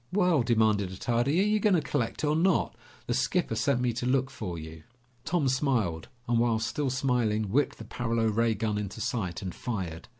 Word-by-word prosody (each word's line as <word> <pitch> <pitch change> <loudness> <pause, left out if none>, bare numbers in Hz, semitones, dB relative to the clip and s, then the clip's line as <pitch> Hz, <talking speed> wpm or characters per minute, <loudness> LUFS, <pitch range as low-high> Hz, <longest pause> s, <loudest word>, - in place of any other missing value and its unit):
"Well," 180 -6 +3
demanded 110 -4 +2
Attardi, 120 - 0
"are 205 - +2
you 215 0 +2
going 205 -2 +3
to - - +4
collect 125 -2 -2
or 150 0 +2
not? 175 +3 +2 0.3
The 120 - -1
skipper 130 +3 0
sent 125 +3 +1
me 125 -1 +1
to 120 +2 -3
look 135 +1 +1
for 90 -9 -5
you." 80 0 -9 0.4
Tom 160 -3 +1
smiled, 125 - 0 0.2
and 120 -1 +2
while 115 -1 +2
still 120 +6 -1
smiling, 120 -6 0
whipped 140 +6 +1
the 115 - -9
paralo 115 0 -1
ray 110 +1 +2
gun 105 -1 -1
into 105 +2 -5
sight 110 -6 -2
and 90 -2 -4
fired. 95 -9 -5
120 Hz, 195 wpm, -28 LUFS, 105-135 Hz, 0.4 s, to